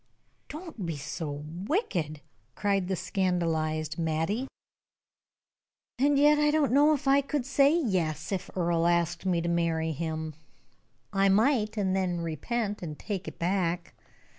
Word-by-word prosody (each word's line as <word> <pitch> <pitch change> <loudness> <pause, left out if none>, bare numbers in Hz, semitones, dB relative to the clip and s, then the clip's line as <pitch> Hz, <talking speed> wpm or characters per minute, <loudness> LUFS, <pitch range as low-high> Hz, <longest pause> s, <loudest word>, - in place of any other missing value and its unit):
"Don't 310 - -7
be 165 -3 -3
so 150 +2 -5
wicked," 160 - -3 0.3
cried 195 -3 0
the 190 - 0
scandalized 160 -4 -1
Mattie. 165 +10 -1 1.5
"And 285 +2 +4
yet 295 +1 +5
I 295 0 +4
don't 300 -3 +2
know 295 +3 +5
that 285 0 -6
I 275 +1 +5
could 280 -2 -2
say 275 +1 +4
'yes,' 170 - -1
if 190 -1 -3
Earle 170 -1 +2
asked 170 +1 +1
me 175 -2 +2
to 170 - -3
marry 165 -1 +1
him. 160 0 -3 0.8
I 195 0 +3
might, 220 +1 +2
and 190 -2 +1
then 180 -3 0
repent, 205 - -2
and 155 -4 -6
take 195 -3 -5
it - - -7
back. 175 -1 -1
185 Hz, 140 wpm, -28 LUFS, 165-240 Hz, 1.5 s, yet